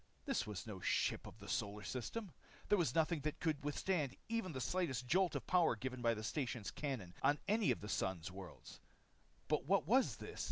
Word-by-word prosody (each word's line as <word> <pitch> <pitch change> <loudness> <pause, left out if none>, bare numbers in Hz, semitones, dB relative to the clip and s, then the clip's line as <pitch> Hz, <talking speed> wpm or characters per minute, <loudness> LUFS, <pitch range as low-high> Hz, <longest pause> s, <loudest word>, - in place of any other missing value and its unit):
This - - 0
was 105 -4 -4
no 105 -4 -6
ship - - +1
of - - -11
the 100 -1 -11
solar 105 -2 -1
system. 175 - -4 0.4
There 205 - +6
was 170 - +1
nothing 165 0 +3
that 150 +1 -2
could 155 -4 0
withstand 145 -1 0
even 230 -5 0
the 130 - -4
slight 175 +8 +1 0.2
jolt 180 +6 +3
of - - -2
power 175 -8 +4
given 130 +2 -4
by 115 -1 +3
the 110 - -5
station 125 -2 -2
cannon 125 -12 -3
on 145 +2 +4
any 215 0 +3
of - - +2
the 105 - -6
Sun's 95 -4 -1
worlds. 95 -2 -10 0.7
But 150 -2 +1
what 195 +2 +4
was 255 +5 +4
this? - - -8
140 Hz, 200 wpm, -39 LUFS, 110-175 Hz, 0.7 s, There